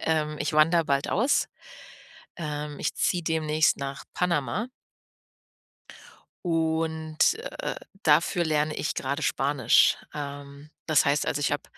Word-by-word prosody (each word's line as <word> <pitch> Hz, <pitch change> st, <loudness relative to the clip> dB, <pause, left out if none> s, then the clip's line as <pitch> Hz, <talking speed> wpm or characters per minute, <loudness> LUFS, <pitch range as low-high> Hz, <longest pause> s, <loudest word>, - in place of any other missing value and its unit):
Ähm, 155 Hz, -1 st, 0 dB
ich 155 Hz, -, -1 dB
wandere 165 Hz, +2 st, +4 dB
bald 140 Hz, 0 st, 0 dB
aus. 240 Hz, +9 st, +2 dB, 0.9 s
Ähm, 150 Hz, -3 st, -5 dB
ich -, -, -1 dB
ziehe 175 Hz, -1 st, +1 dB
demnächst 155 Hz, -1 st, +2 dB
nach 140 Hz, +1 st, -5 dB
Panama 180 Hz, -, 0 dB, 1.8 s
und, 160 Hz, -1 st, -1 dB, 0.4 s
äh, -, -, -3 dB, 0.3 s
dafür 165 Hz, +3 st, +3 dB
lerne 155 Hz, -1 st, 0 dB
ich -, -, -2 dB
grade 140 Hz, +4 st, -2 dB
Spanisch. 135 Hz, -3 st, +3 dB, 0.2 s
Ähm, 145 Hz, 0 st, -8 dB, 0.2 s
das 155 Hz, -2 st, +4 dB
heißt, 145 Hz, +1 st, +2 dB
also, 145 Hz, -, -1 dB
ich 145 Hz, -, +1 dB
habe, 145 Hz, -, -4 dB
155 Hz, 120 wpm, -26 LUFS, 145-160 Hz, 1.8 s, wandere